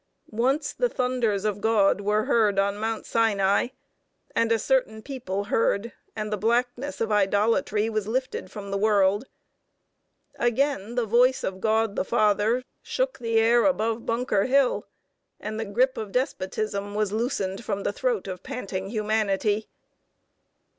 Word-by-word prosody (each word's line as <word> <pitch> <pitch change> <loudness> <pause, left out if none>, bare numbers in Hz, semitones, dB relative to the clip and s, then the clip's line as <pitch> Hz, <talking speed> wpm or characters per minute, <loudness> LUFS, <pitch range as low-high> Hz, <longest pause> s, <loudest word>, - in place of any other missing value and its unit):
Once 260 +7 0
the - - 0
thunders 245 - 0
of 205 -1 -1
God 205 -3 +3
were 210 +1 +1
heard 220 -6 +2
on 200 0 +2
Mount 225 0 -2
Sinai, 200 -2 +2 0.7
and 230 0 +2
a 230 - +4
certain 220 -3 0
people 245 -8 -4
heard, 215 +1 0 0.2
and 215 -1 -3
the - - 0
blackness 245 +5 0
of 225 -1 0
idolatry 210 +2 +2
was 215 -2 -2
lifted 255 -4 -2
from 200 -1 -7
the 200 - -1
world. 205 +1 +3 1.1
Again 240 -2 0
the 245 -2 +1
voice 245 +4 +3
of 190 0 -4
God, 220 -1 +1
the - - 0
Father, 215 +5 +2 0.2
shook - - -2
the 230 -2 0
air 230 +1 +4
above 230 -4 +1
Bunker 230 -4 0
Hill, 270 0 +2 0.5
and 215 +1 -5
the 225 - -2
grip 250 +6 +1
of 215 -3 -5
despotism 205 -4 -2
was 210 -2 0
loosened 215 -3 -2
from 200 -2 -3
the - - -1
throat 485 - -1
of 180 -1 -6
panting 195 -8 -5
humanity. 215 -1 0
220 Hz, 145 wpm, -25 LUFS, 205-240 Hz, 1.1 s, a